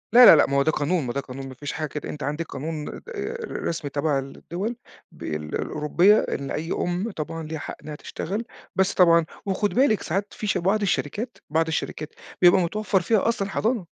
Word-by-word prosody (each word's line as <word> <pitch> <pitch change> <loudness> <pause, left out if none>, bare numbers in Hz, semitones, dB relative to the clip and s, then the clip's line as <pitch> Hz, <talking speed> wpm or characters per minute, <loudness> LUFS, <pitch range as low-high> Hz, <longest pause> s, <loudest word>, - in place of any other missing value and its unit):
لا، 245 +1 +10
لا، - - +11
لأ، 150 - +5
ما 140 - +1
هو - - +5
ده 155 - +3
قانون، 155 +3 0
ما 120 - -3
ده 140 - -1
قانون 135 0 -8
ما - - -8
فيش 145 +2 -5
حاجة 155 -1 -2
كده، 150 - -5
أنتِ 150 - -6
عندِك 150 +4 -2
قانون 150 +1 -5
د - - -5 0.5
ر - - -5
رسمي 165 -3 -3
تبع 145 0 +1
الدول 175 - -5 0.4
بال 75 - -5 0.3
الأوروبية 170 +7 +3
إن 140 -1 -3
أي 160 +3 -3
أُم 180 +6 -1
طبعًا 165 -1 -5
ليها 155 0 -5
حق - - -6
إنّها 150 -1 -6
تشتغل، 195 +8 -4 0.3
بس 190 0 +2
طبعًا 170 -2 +5 0.2
وخُدي 200 +1 0
بالِك 250 -4 +4
ساعات 195 +5 -2
في 215 - -5
ش - - +2
بعض 195 +5 +1
الشركات 205 - -1
بعض 160 +2 +2
الشركات 155 -1 -3 0.3
بيبقى 180 +1 +7
متوفّر 195 +2 +1
فيها 215 +4 +2
أصلًا 200 -4 0
حضانة 220 -1 0
170 Hz, 205 wpm, -25 LUFS, 150-200 Hz, 0.5 s, لا